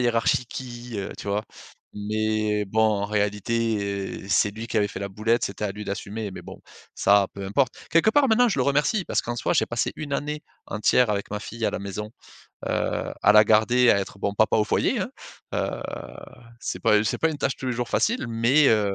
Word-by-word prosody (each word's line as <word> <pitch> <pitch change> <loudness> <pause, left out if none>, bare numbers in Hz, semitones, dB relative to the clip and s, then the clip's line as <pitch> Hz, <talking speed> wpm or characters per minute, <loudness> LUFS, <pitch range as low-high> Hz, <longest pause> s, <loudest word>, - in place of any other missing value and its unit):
hiérarchie 120 0 +2
qui, 120 -1 -8
heu», 100 - -4
tu 100 - -6
vois? 105 +2 -1 0.5
Mais 105 0 0
bon, 110 +3 0
en 105 -2 +2
réalité, 105 +2 0 0.5
heu, - - -11
c'est 100 - +3
lui 110 +3 -7
qui 115 - -4
avait 105 -1 +2
fait - - -7
la 100 - -3
boulette, 110 +4 0
c'était 100 +2 -4
à 100 - -1
lui 105 +1 -7
d'assumer 100 +1 -4
mais - - -8
bon, - - -11 0.3
ça, 100 -1 +4
peu 100 - -6
importe. 125 +5 +1 0.2
Quelque 165 +6 +4
part, 280 +3 +4
maintenant, 245 +2 +4
je 195 - -1
le 130 - +2
remercie 150 - +1
parce - - 0
qu'en 120 0 -4
soi, - - 0
j'ai 150 - +3
passé 120 0 -1
1 145 -2 -6
année 150 +2 -2 0.2
entière 110 +4 +2
avec 100 -1 -2
ma 105 0 -3
fille, 115 +1 -6
à - - +2
la - - -3
maison, 100 +2 -5 0.6
heu, - - -1
à 105 - +6
la 105 0 +8
garder, 115 +3 +4
à - - +4
être, 100 0 -5
bon, 100 0 -1
papa 110 +1 +3
au 110 - +3
foyer, - - +1
hein. - - -3 0.4
Heu, - - -2 0.8
c'est 90 - -4
pas 105 +2 +4
c'est - - -1
pas 160 - +2
une 150 - -5
tâche, 135 -1 -1
tous 130 - -6
les 125 - 0
jours, 120 0 -3
facile 230 - +1
mais 120 +6 +4
heu 105 -3 +2
110 Hz, 220 wpm, -25 LUFS, 105-125 Hz, 0.8 s, la